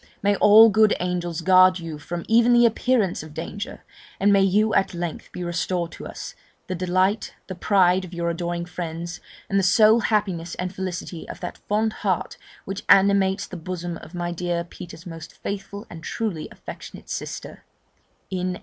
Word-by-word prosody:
may 205 0 +3
all 215 +2 +8
good 215 0 +4
angels 175 -2 -2
guard 185 +1 +6
you 165 -3 -7
from 170 +3 -5
even 235 +2 +5
the 240 0 +6
appearance 230 -4 +1
of 155 -1 -11
danger! 205 +6 -6 0.4
and 200 +1 +4
may 195 - +5
you 210 +3 +3
at 195 - +1
length 170 -2 -5
be 180 - -6
restored 175 0 -2
to - - -8
us, - - -8 0.3
the 185 - -4
delight, 185 +3 0
the 185 - -6
pride 185 0 +3
of 180 - -9
your 170 -1 -3
adoring 170 0 -2
friends, 170 0 -5 0.3
and 195 - +1
the - - +1
sole 215 +4 +6
happiness 195 -7 -1
and 180 +1 -4
felicity 180 -3 -5
of - - -7
that 175 - -6
fond 215 +1 +1
heart 190 -4 -1 0.3
which 195 +1 -5
animates 195 0 +4
the - - -9
bosom 175 0 -5
of 170 - -12
my 175 0 -2
dear 175 0 -2
Peter's 170 0 -11
most 165 -2 -9
faithful 200 +1 -5
and 165 -2 -10
truly 200 -9 -3
affectionate - - -10
sister, - - -6 0.7
N. 185 -1 -2
185 Hz, 175 wpm, -24 LUFS, 175-200 Hz, 0.7 s, all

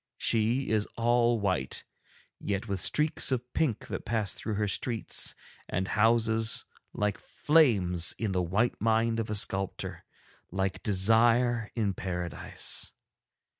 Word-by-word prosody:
She 115 +4 +1
is 105 -1 +1
all 120 0 +2
white, 95 -10 -1 0.6
yet 100 +2 -3
with 100 -3 -2
streaks 150 - +2
of 125 -1 -3
pink 130 -10 0
that - - -4
pass 105 -4 -1
through 110 - -4
her 105 0 0
streets 115 +4 0 0.3
and 95 +1 -2
houses 110 0 +2 0.3
like 105 -1 -2
flames 100 - +2
in 110 -3 -2
the 90 -1 0
white 100 +8 0
mind 115 +1 +2
of 110 - -3
a 105 - -2
sculptor, 95 -1 -2 0.5
like 95 +1 -2
desire 115 +3 +3
in 105 -4 0
Paradise. 90 -3 -3
110 Hz, 130 wpm, -29 LUFS, 95-115 Hz, 0.6 s, desire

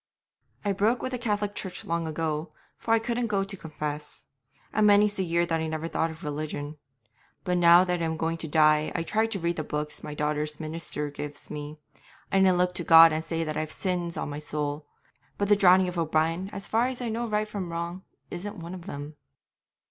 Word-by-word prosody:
I 205 - +2
broke 215 +5 +1
with 255 - -2
the 250 - -3
Cath'lic 210 -3 -1
Church 190 -3 -4
long 170 0 -1
ago, 155 0 -2 0.3
for 225 - -4
I - - +4
couldn't 235 +1 -1
go 200 -3 +1
to 195 +1 -5
confess; 150 -3 -6 0.5
and 215 -1 +4
many's 205 0 +5
the 195 - -1
year 170 0 +1
that 165 -1 0
I 160 - -2
never 160 +1 -3
thought 165 0 0
of 160 +2 -10
religion. 150 0 -4 0.6
But 180 -2 +1
now 170 +1 +8
that 180 -2 -1
I - - +1
am 160 0 -2
going 165 +1 -1
to 165 - -6
die 155 0 +4
I 165 - 0
try 220 +6 +1
to 220 -3 -3
read 170 0 -1
the 155 - -1
books 150 0 -4
my 150 - -7
daughter's 150 0 -2
minister 155 -2 -4
gives 145 0 -7
me, 150 +1 -6 0.5
and 190 -1 +5
I - - +5
look 180 0 +2
to 175 - -2
God 165 -1 +9
and 155 +1 -1
say 165 0 -2
that 155 -1 -3
I've 155 0 -2
sins 175 -3 -2
on - - -2
my 145 - -5
soul, 150 0 -3 0.5
but 200 0 0
the 205 - +7
drowning 190 -2 +5
of 175 -1 -3
O'Brien, 165 +3 0
as 195 - -5
far 230 +3 +2
as 255 -1 -3
I 245 -2 -2
know 235 +2 -2
right 215 0 0
from 195 -5 -5
wrong, 170 +2 -4 0.3
isn't 205 +4 -4
one 170 0 -7
of 180 0 -9
them.' 145 -2 -7
170 Hz, 220 wpm, -27 LUFS, 155-195 Hz, 0.6 s, God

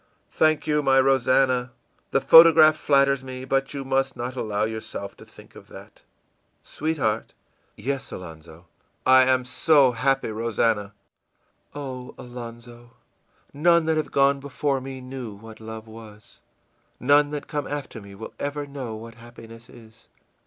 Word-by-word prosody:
ìThank 155 -1 +2
you, 150 -1 +1
my 135 -1 +3
Rosannah! 130 -1 +2 0.4
The - - +1
photograph 160 -1 +8
flatters 140 -2 +2
me, 130 0 -8
but 135 +1 -1
you 135 -1 -5
must 135 -1 -1
not 120 +2 -5
allow 105 -4 -2
yourself 110 -2 -5
to - - -14
think - - -17
of - - -14
that. - - -14 0.6
Sweetheart?î 135 -9 -5
ìYes, 135 -3 -3
Alonzo.î 80 -1 -11 0.4
ìI 130 0 +6
am 130 -1 +2
so 130 +1 +3
happy, 135 -1 0
Rosannah.î 110 +4 -5
ìOh, 130 -3 -8
Alonzo, 120 -1 -11 0.6
none 170 +3 +3
that 160 0 +1
have 155 - -2
gone 140 0 +3
before 140 0 -2
me 130 0 -8
knew 125 -4 -8
what 110 +2 -13
love 110 0 -9
was, 110 -1 -14 0.6
none 145 +3 +4
that 150 -1 -6
come 145 -2 -4
after 140 -6 -6
me 100 0 -13
will 110 +3 -9
ever 145 0 -4
know 135 -5 -7
what 115 +1 -10
happiness 115 0 -14
is. 115 0 -17
130 Hz, 145 wpm, -24 LUFS, 115-140 Hz, 0.6 s, photograph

